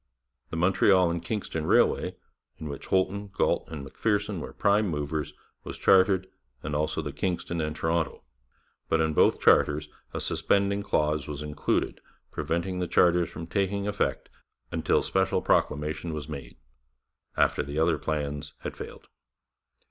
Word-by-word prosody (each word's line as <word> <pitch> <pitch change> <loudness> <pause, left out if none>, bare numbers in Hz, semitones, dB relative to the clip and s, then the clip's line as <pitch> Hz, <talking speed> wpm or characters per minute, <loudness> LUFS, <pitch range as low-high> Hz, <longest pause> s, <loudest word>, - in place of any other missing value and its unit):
The 80 - -4
Montreal 95 0 +4
and 85 0 -3
Kingston 85 -6 -3
Railway, - - +3 0.4
in 75 - -6
which 70 - -7
Holton, 95 +2 +1
Galt, 100 - 0
and 75 -4 -6
Macpherson 105 +6 -1
were - - -6
prime 100 +1 +2
movers, 75 -2 -2 0.3
was - - -7
chartered, 95 0 +4 0.4
and 75 0 -3
also 75 +1 -1
the 75 - -4
Kingston 85 +1 -2
and 75 0 -2
Toronto, 80 +1 -1 0.7
but 80 - +3
in 80 -1 +1
both - - +4
charters 75 0 +4 0.2
a - - -4
suspending 100 0 +1
clause 75 -6 0
was 75 0 -5
included 75 0 -1 0.3
preventing 90 +2 -2
the 90 - -1
charters 85 0 +3
from 85 -1 -7
taking 100 +4 -1
effect 105 -1 -1 0.4
until - - +1
special - - +1
proclamation 75 +3 0
was 75 -1 -5
made 70 -6 -8 0.8
after - - +3
the 70 +2 -5
other 80 -1 +2
plans 75 -1 -3
had - - -5
failed. - - -9
80 Hz, 145 wpm, -27 LUFS, 75-95 Hz, 0.8 s, Montreal